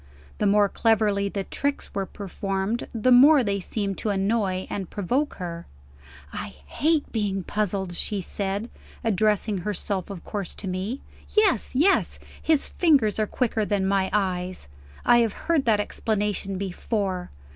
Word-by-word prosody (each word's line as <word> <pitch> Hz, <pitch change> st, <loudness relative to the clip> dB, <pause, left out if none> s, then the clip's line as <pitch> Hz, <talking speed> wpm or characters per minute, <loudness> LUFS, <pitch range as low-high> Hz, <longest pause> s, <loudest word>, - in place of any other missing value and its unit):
The 210 Hz, -, +2 dB
more 205 Hz, 0 st, +5 dB
cleverly 205 Hz, -2 st, +2 dB
the 195 Hz, 0 st, -3 dB
tricks 280 Hz, +8 st, -3 dB
were 195 Hz, -1 st, -2 dB
performed, 195 Hz, +2 st, -3 dB
the 235 Hz, +2 st, +1 dB
more 270 Hz, +3 st, +8 dB
they 200 Hz, -2 st, 0 dB
seemed 195 Hz, 0 st, -3 dB
to 215 Hz, -, -1 dB
annoy 195 Hz, -1 st, 0 dB
and 190 Hz, -4 st, -4 dB
provoke 250 Hz, +10 st, -1 dB
her. 170 Hz, -2 st, -6 dB, 0.7 s
"I -, -, -6 dB
hate 310 Hz, -, 0 dB
being 200 Hz, -4 st, -1 dB
puzzled!" 195 Hz, -2 st, -2 dB
she 200 Hz, +3 st, -2 dB
said, 200 Hz, +4 st, -3 dB, 0.3 s
addressing 215 Hz, -1 st, +2 dB
herself 200 Hz, 0 st, -2 dB
of 195 Hz, -4 st, -7 dB
course 200 Hz, -4 st, -4 dB
to 200 Hz, -, -7 dB
me. 190 Hz, +8 st, -3 dB, 0.3 s
"Yes, 400 Hz, -, +3 dB
yes; 350 Hz, +9 st, +3 dB, 0.2 s
his 315 Hz, -3 st, +2 dB
fingers 275 Hz, -, +2 dB
are 215 Hz, -, +1 dB
quicker 225 Hz, -2 st, 0 dB
than 205 Hz, -2 st, 0 dB
my 195 Hz, -1 st, +2 dB
eyes 185 Hz, -, -1 dB, 0.4 s
I 240 Hz, -, +6 dB
have 230 Hz, -3 st, +2 dB
heard 330 Hz, -5 st, 0 dB
that 220 Hz, -3 st, +3 dB
explanation 205 Hz, -2 st, -1 dB
before. 190 Hz, -1 st, -2 dB
205 Hz, 145 wpm, -25 LUFS, 195-225 Hz, 0.7 s, more